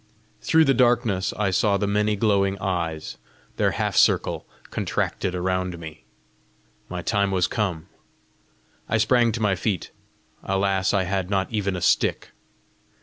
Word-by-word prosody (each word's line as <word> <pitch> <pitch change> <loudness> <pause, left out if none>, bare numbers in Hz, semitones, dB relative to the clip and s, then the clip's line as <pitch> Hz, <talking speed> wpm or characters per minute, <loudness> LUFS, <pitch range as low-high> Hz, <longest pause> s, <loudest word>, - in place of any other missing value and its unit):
Through 160 0 +4
the 135 - +4
darkness 120 -6 +2
I 100 -2 +1
saw 100 +2 +2
the 100 - -1
many 105 +1 +1
glowing 100 -2 +1
eyes; 85 -5 -3 0.4
their - - +2
half - - -2
circle - - +2 0.2
contracted 90 - -2
around 90 0 -1
me. 80 -1 -10 0.8
My 90 -1 -5
time 100 -1 +1
was 95 -2 +1
come! 95 -8 -2 1.0
I 110 - +2
sprang 115 +1 +3
to 115 - -3
my 105 -3 +2
feet. 95 -1 -2 0.5
Alas, 95 -1 +1
I 100 -2 +1
had 95 0 -2
not 95 -1 -1
even 100 -3 -1
a 90 - -4
stick! - - +1
100 Hz, 145 wpm, -24 LUFS, 90-105 Hz, 1.0 s, Through